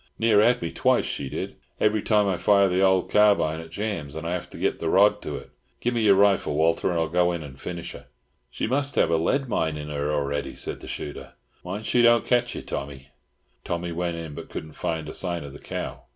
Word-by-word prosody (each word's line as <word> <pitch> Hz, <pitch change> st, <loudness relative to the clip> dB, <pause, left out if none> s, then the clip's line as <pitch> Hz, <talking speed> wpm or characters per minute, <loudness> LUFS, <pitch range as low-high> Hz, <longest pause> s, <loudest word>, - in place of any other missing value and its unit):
Near 110 Hz, -2 st, +4 dB
had 120 Hz, -1 st, +3 dB
me 85 Hz, -, -3 dB
twice, -, -, +2 dB
she 70 Hz, -2 st, -3 dB
did. -, -, -5 dB, 0.2 s
Every 105 Hz, 0 st, +2 dB
time 105 Hz, -1 st, +3 dB
I 95 Hz, -, +1 dB
fire 100 Hz, +2 st, +4 dB
the 90 Hz, 0 st, +1 dB
old 95 Hz, -1 st, +3 dB
carbine, 100 Hz, -7 st, +4 dB
it 80 Hz, 0 st, -9 dB
jams, 85 Hz, -6 st, -4 dB
and 80 Hz, +1 st, -5 dB
I 85 Hz, -, -1 dB
have 90 Hz, -1 st, -4 dB
to -, -, -11 dB
get -, -, -1 dB
the 80 Hz, -, -1 dB
rod 105 Hz, +3 st, +4 dB
to 75 Hz, -, -5 dB
it. -, -, -9 dB, 0.3 s
Gimme 120 Hz, -1 st, 0 dB
your 100 Hz, -3 st, +6 dB
rifle, 100 Hz, -6 st, +3 dB
Walter, 80 Hz, +4 st, +2 dB
and 85 Hz, -2 st, 0 dB
I'll 80 Hz, -, +1 dB
go 90 Hz, +2 st, +2 dB
in 85 Hz, -2 st, -4 dB
and 70 Hz, -2 st, -11 dB
finish 85 Hz, -1 st, -5 dB
her." -, -, -12 dB, 0.4 s
"She -, -, -3 dB
must 135 Hz, +3 st, -1 dB
have -, -, +3 dB
a 85 Hz, -, +3 dB
lead 135 Hz, -, 0 dB
mine 80 Hz, -8 st, -1 dB
in 75 Hz, 0 st, -6 dB
her 75 Hz, 0 st, -2 dB
already," 70 Hz, -1 st, -2 dB
said -, -, -4 dB
the -, -, -11 dB
shooter. 75 Hz, -, -7 dB, 0.3 s
"Mind 100 Hz, +4 st, -5 dB
she 120 Hz, -, +3 dB
don't 120 Hz, -1 st, +5 dB
ketch 120 Hz, -1 st, +1 dB
you, -, -, -6 dB
Tommy." 70 Hz, -1 st, -6 dB, 0.5 s
Tommy 85 Hz, 0 st, -3 dB
went 85 Hz, 0 st, -2 dB
in, 80 Hz, -3 st, -6 dB
but -, -, -9 dB
couldn't 80 Hz, -, -7 dB
find 80 Hz, -2 st, -3 dB
a -, -, -6 dB
sign 85 Hz, -4 st, -2 dB
of 70 Hz, -1 st, -9 dB
the 70 Hz, -, -10 dB
cow. -, -, -5 dB
85 Hz, 240 wpm, -25 LUFS, 80-105 Hz, 0.5 s, your